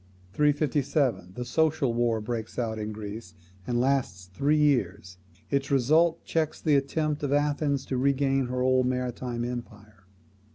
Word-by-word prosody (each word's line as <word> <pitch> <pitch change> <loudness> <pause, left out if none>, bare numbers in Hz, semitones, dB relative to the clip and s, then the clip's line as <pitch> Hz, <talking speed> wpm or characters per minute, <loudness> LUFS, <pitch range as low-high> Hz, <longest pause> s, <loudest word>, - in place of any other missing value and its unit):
357. 140 - +1
The 125 - -4
Social 150 -1 +1
War 120 -1 +1
breaks 110 0 -5
out 110 -2 -2
in 105 0 -4
Greece, 105 -3 -8 0.3
and 120 -1 0
lasts 120 -9 -1
three 145 +9 +2
years. 100 -10 0 0.3
Its 140 -1 0
result 155 +5 +3
checks 160 -2 -1
the 155 -3 +2
attempt 150 +2 0
of 145 -2 -2
Athens 145 -1 +1
to 130 - -2
regain 135 0 +1
her 125 0 -2
old 130 0 +3
maritime 125 -1 -2
empire. 105 -5 -8
130 Hz, 140 wpm, -27 LUFS, 115-145 Hz, 0.3 s, result